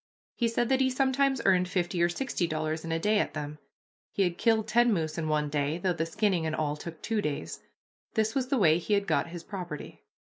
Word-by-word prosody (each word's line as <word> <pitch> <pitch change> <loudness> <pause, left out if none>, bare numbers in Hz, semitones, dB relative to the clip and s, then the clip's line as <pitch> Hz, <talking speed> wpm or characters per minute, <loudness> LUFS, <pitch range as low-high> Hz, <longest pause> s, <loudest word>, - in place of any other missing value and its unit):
He 235 - 0
said 230 +1 0
that 265 0 +3
he 260 - +3
sometimes 265 0 +1
earned 180 -2 +4
fifty 175 -1 -1
or 175 - +4
sixty 180 -2 -1
dollars 155 0 -2
in 165 - -4
a 165 - +1
day 210 +5 +2
at - - -1
them; 150 +1 -5 0.5
he 200 - +1
had 175 -1 -1
killed 225 -2 +2
ten 240 0 +4
moose 160 -5 -1
in 160 -2 -2
one 150 -1 +1
day, 145 +1 -1
though 180 0 0
the 165 -1 -2
skinning 185 -3 +1
and 155 - -1
all 150 -1 -1
took 160 +1 -9
two 225 -2 0
days. 140 - -4 0.6
This 220 0 +1
was 265 -2 0
the 270 - +1
way 165 -6 +4
he 205 +4 +1
had 200 0 0
got - - +1
his 170 0 -8
property. 175 -7 -7
175 Hz, 235 wpm, -29 LUFS, 155-220 Hz, 0.6 s, earned